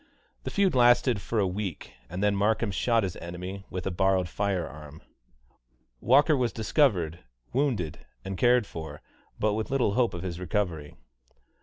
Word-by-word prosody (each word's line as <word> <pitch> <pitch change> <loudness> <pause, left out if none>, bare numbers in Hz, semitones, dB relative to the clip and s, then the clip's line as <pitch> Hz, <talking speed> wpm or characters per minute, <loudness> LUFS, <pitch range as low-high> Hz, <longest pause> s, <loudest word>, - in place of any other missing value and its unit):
The - - -2
feud 195 -4 +2
lasted 120 -2 +4
for 115 - -3
a 105 - +3
week, 95 -2 -4 0.2
and 90 +4 -4
then 105 -1 +3
Markham 105 +2 +1
shot 115 +3 +1
his 95 -3 -3
enemy 90 +3 -7
with 90 - -5
a 95 - -1
borrowed 95 0 +2
fire 95 -2 -1
arm. 75 +1 -12 1.0
Walker 145 - +4
was 125 -4 0
discovered 105 - +1 0.3
wounded, 120 - 0 0.3
and 95 0 -4
cared 120 +2 +4
for, 80 -5 -8 0.4
but 105 0 +2
with 110 +1 -3
little 130 -7 +1
hope 120 -4 +1
of 85 - -6
his 90 -2 -4
recovery. 85 -5 -2
100 Hz, 160 wpm, -27 LUFS, 90-120 Hz, 1.0 s, lasted